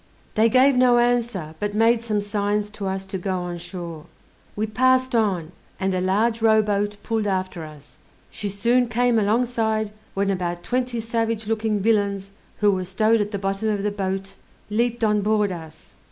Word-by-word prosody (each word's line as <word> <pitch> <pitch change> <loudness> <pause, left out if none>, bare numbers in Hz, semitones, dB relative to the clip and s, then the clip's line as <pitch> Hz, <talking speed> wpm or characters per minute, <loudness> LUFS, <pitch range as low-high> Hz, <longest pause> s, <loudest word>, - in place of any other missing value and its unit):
They 220 +1 +4
gave 260 +3 +5
no 250 -1 +5
answer, 240 -9 0
but 205 0 -2
made 225 +1 +4
some 215 -3 -1
signs 205 0 -1
to 205 -2 -5
us 190 0 -3
to 190 0 -5
go 180 -1 -2
in 175 0 -5
shore. 170 -3 -7 0.5
We 215 - 0
passed 255 +4 +2
on, 190 -8 +1 0.3
and 190 0 0
a 185 - 0
large 220 +5 +1
rowboat 210 -2 +2
pulled 225 -2 -1
after 185 -3 -2
us; 155 0 -13 0.3
she 205 - -4
soon 235 +5 +2
came 240 0 +2
alongside, 220 0 +1 0.2
when 200 0 +1
about 175 -2 -3
twenty 245 -1 -1
savage 225 -1 -1
looking 215 -1 0
villains, 200 -3 +1 0.3
who 205 -1 +5
were 185 -1 -1
stowed 215 +4 +2
at 205 - -1
the 205 - -3
bottom 195 +2 -1
of 205 -2 -1
the 210 - 0
boat, 195 -1 -3 0.4
leaped 235 +2 0
on 210 -1 +3
board 210 -1 +1
us. 160 -3 -10
210 Hz, 175 wpm, -23 LUFS, 195-230 Hz, 0.5 s, gave